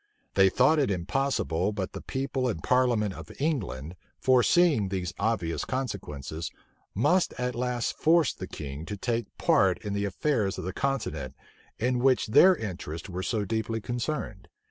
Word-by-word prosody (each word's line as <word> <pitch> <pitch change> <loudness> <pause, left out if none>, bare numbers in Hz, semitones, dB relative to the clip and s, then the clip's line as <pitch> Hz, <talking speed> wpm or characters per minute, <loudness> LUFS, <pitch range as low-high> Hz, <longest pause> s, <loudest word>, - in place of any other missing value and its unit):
They 95 -1 +5
thought 130 +10 +4
it 140 - +2
impossible 95 - 0
but 95 -3 -3
the - - -6
people 130 -1 -2
and 95 -10 -3
parliament 120 -6 +2
of 80 -2 -10
England, 95 - -2 0.2
foreseeing 130 - +4
these 95 -3 -3
obvious 100 -6 0
consequences, 85 - -4 0.5
must 175 - +2
at 125 0 -1
last 125 0 -1
force 160 -2 +4
the - - -7
king 70 0 -7
to 105 - -4
take 120 +2 -1
part - - +3
in 100 - -2
the 100 0 0
affairs 105 0 0
of - - -5
the 95 - -3
continent, 135 - -2 0.4
in 125 +2 0
which 130 0 +3
their 185 - +7
interests 90 - -6
were 90 0 -4
so 105 +1 -1
deeply 110 +2 -2
concerned. 120 -3 -4
110 Hz, 155 wpm, -28 LUFS, 95-130 Hz, 0.5 s, their